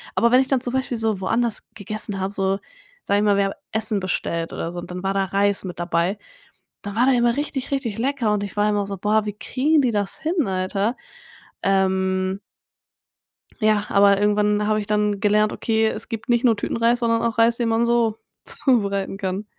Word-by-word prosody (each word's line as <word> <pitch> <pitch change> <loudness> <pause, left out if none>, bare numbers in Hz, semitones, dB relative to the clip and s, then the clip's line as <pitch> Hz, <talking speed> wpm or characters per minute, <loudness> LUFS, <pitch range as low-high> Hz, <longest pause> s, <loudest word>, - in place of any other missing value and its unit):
Aber 235 +1 +3
wenn 255 - +6
ich 265 - -3
dann 270 -2 +2
zum 245 -1 -4
Beispiel 260 -2 -1
so 220 -4 0
woanders 230 +3 -1
gegessen 205 -1 -5
habe, 190 +1 -3
so, 195 0 0 0.4
sage 200 - +1
ich - - +1
mal, 205 -1 +3
wir 200 - +3
haben 195 - -2 0.2
Essen 220 -1 0
bestellt 170 -2 -2
oder 165 - -4
so 175 - -5
und 175 - -8
dann 180 +1 -6
war 195 - 0
da 195 0 +1
Reis 200 +1 +1
mit 180 -3 -7
dabei, 175 +3 0 0.7
dann 205 +1 -6
war 245 +2 +3
der 270 - +4
immer 240 -1 +3
richtig, 285 -2 -3
richtig 265 -7 -2
lecker 250 -3 0
und 210 -1 0
ich 200 - -8
war 210 0 +3
immer 205 -1 +1
so: 200 -1 -5
Boah, 210 +3 +1
wie 210 - -2
kriegen 295 +8 +1
die 250 -3 +1
das 205 -2 -2
hin, 320 - 0
Alter? 195 +4 -1 0.7
Ähm. 190 0 +1 1.2
Ja, 215 -1 +2
aber 200 0 +5
irgendwann 210 0 +2
habe 215 0 +2
ich 210 - -4
dann 210 -1 0
gelernt: 210 +1 +3
„Okay, 220 -1 +1
es - - -4
gibt 230 +3 -6
nicht 240 +1 +3
nur 230 -2 +5
Tütenreis, 230 +3 +1
sondern 230 -1 +1
auch 230 -1 -1
Reis, 230 +1 +4
den 235 -2 0
man 225 +1 +2
so 230 -2 +2 0.3
zubereiten 200 -8 0
kann.“ 195 +1 -3
210 Hz, 210 wpm, -22 LUFS, 195-235 Hz, 1.2 s, wenn